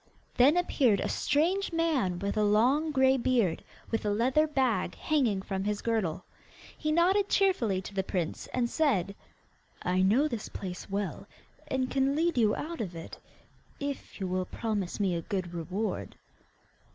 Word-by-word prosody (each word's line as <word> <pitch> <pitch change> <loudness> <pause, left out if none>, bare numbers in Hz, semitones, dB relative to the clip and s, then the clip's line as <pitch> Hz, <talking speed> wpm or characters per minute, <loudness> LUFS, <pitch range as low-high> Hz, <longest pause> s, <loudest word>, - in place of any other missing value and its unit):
Then 280 +7 +5
appeared 260 - +2
a - - -1
strange 360 +7 +1
man 310 - +1
with 200 +2 -2
a 215 - +2
long 245 +10 +3
grey 265 -2 +4
beard, 235 -9 +1 0.3
with 225 - -1
a 210 - 0
leather 255 +9 +2
bag 255 - 0
hanging 240 -11 0
from 190 -1 -3
his 210 0 -2
girdle. 195 -7 -1 0.5
He 305 - -2
nodded 375 +5 +3
cheerfully 235 - +2
to 200 - -8
the 195 - 0
prince, 180 -3 -3
and 245 -1 0
said: 235 - +1 0.7
'I 180 +1 +1
know 225 +11 +4
this 235 -7 -5
place 185 -1 -7
well, 195 -1 -3 0.4
and 260 -2 -1
can 270 +1 +2
lead 335 +2 +1
you 220 -4 +3
out 330 -3 -5
of 180 -5 -5
it, 165 - -8 0.6
if 280 -5 -5
you 195 - -2
will 185 0 -1
promise 210 -3 -3
me 195 -3 +1
a 170 - -1
good 185 -2 -4
reward. 185 +6 -3
225 Hz, 165 wpm, -29 LUFS, 190-285 Hz, 0.7 s, Then